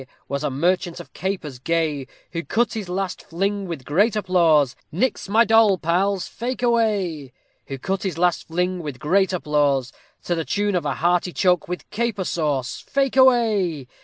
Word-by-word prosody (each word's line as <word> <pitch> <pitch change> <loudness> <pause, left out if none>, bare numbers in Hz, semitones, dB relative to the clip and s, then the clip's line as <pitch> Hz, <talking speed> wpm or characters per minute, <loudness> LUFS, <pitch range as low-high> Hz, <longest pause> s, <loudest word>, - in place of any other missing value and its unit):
_ 130 - -13 0.2
Was 140 +1 -3
a - - 0
merchant 175 +5 0
of 175 - -11
capers 175 -9 -4
gay, 155 -2 -1 0.2
Who 170 -1 -3
cut 235 +5 0
his 210 -5 -5
last 185 0 -3
fling 195 +3 -2
with 160 -7 -6
great 200 +9 +2
applause, 165 - +3 0.2
Nix 200 - -1
my 225 +3 +5
doll 220 -3 +5
pals, 185 +3 0
fake 250 +2 -5
away. 205 - +1 0.4
Who 135 - -5
cut 190 +8 -2
his 185 -5 -3
last 175 0 +1
fling 180 +2 -1
with 145 -5 -6
great 190 +9 +2
applause, 145 -6 +1 0.3
To 175 - -1
the 165 -1 -1
tune 205 +4 -1
of 175 -5 0
a 140 - -1
"hearty 175 +1 +1
choke 180 -3 +2
with 180 +1 -5
caper 220 -3 -1
sauce." 145 -8 -2
_Fake 275 -2 +1
away. 220 - +3
180 Hz, 175 wpm, -22 LUFS, 155-200 Hz, 0.4 s, my